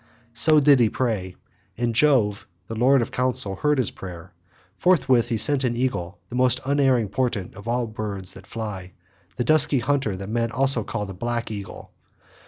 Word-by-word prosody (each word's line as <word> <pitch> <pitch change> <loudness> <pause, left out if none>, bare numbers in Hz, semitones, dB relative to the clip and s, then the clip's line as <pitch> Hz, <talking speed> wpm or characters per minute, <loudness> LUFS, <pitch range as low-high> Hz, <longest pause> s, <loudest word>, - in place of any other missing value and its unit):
So 150 +6 +5
did 140 -2 +5
he 115 -3 +4
pray, 105 -7 -2 0.4
and 120 0 -1
Jove 115 -6 +2 0.2
the 115 - -7
lord 125 +3 +3
of - - -7
counsel 125 -6 -2
heard 150 +4 +1
his 130 -5 0
prayer. 90 -1 -10 0.4
Forthwith 130 - +2
he 115 - 0
sent 135 +5 +2
an 120 -2 0
eagle, 110 -8 -2
the - - -11
most 125 -1 +2
unerring 135 -5 +2
portent 115 -5 -2
of 100 +3 -12
all 120 +1 0
birds 105 -4 -5
that 100 - -14
fly, 95 -5 -6 0.4
the 125 - -1
dusky 155 0 +3
hunter 130 -5 0
that 95 +1 -7
men 115 +1 -1
also 135 -3 +3
call 105 -1 -4
the 95 - -8
Black 120 +4 -3
Eagle. 100 -3 -8
120 Hz, 180 wpm, -23 LUFS, 105-130 Hz, 0.4 s, So